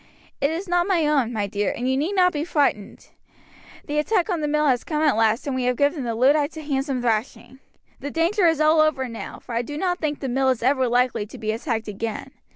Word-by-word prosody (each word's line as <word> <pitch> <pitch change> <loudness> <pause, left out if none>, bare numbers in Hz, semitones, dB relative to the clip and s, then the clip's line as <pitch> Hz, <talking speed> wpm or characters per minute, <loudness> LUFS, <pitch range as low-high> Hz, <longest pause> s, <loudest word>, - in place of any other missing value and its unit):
"It 280 - +3
is 340 +5 -4
not 350 0 +1
my 350 -5 +2
own, 280 -6 +1
my 215 -3 -1
dear, 200 0 -1
and 245 - -2
you 260 - +1
need 310 +9 -1
not 360 -1 +4
be 295 0 -2
frightened. 285 - -1 0.8
The 295 +1 -1
attack 375 +4 +1
on 340 -3 -1
the 300 - -1
mill 300 +1 +1
has 255 -4 +2
come 305 -1 -2
at 295 -6 +3
last 225 +1 +1
and 275 -2 -2
we 255 -1 -1
have 250 0 +1
given 285 -1 +1
the 230 -1 -2
Luddites 285 +6 +2
a - - -5
handsome 270 -3 -2
thrashing. 235 +3 -2 0.4
The 285 - -5
danger 345 +5 +2
is 325 -2 +2
all 310 +1 +4
over 285 -4 +1
now, 230 -2 -8
for 240 - -10
I 230 - +1
do 290 +4 -7
not 355 +1 -1
think 300 -2 -2
the 270 - -4
mill 265 +1 +1
is 255 -3 -1
ever 260 0 +2
likely 245 -3 +1
to - - -11
be 215 -1 -2
attacked 225 -1 -3
again. 215 +2 -5
280 Hz, 245 wpm, -23 LUFS, 240-310 Hz, 0.8 s, not